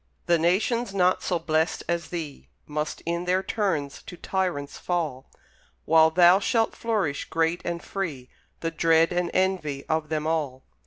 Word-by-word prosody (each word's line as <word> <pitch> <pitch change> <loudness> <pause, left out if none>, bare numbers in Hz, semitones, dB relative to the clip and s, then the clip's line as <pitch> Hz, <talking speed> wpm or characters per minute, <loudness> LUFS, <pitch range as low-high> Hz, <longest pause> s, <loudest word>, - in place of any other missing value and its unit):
The 170 -1 +3
nations, 200 +6 +1
not 185 -1 +3
so 180 - 0
blest 160 0 0
as 170 0 -1
thee, 160 -5 -6 0.2
Must 150 +1 -4
in 170 +1 -2
their 185 +1 +1
turns 165 -12 -2
to 175 - -10
tyrants 175 -7 -2
fall, 155 -7 -3 0.6
While 160 0 +6
thou 175 +3 +6
shalt 225 +2 +1
flourish 210 -11 -1
great 165 +1 0
and 170 0 -4
free 155 -11 -4 0.3
The 165 - -1
dread 165 +1 +3
and 175 0 0
envy 180 -7 0
of 160 -1 -1
them 155 -1 -1
all. 150 -5 -2
170 Hz, 155 wpm, -26 LUFS, 155-185 Hz, 0.6 s, While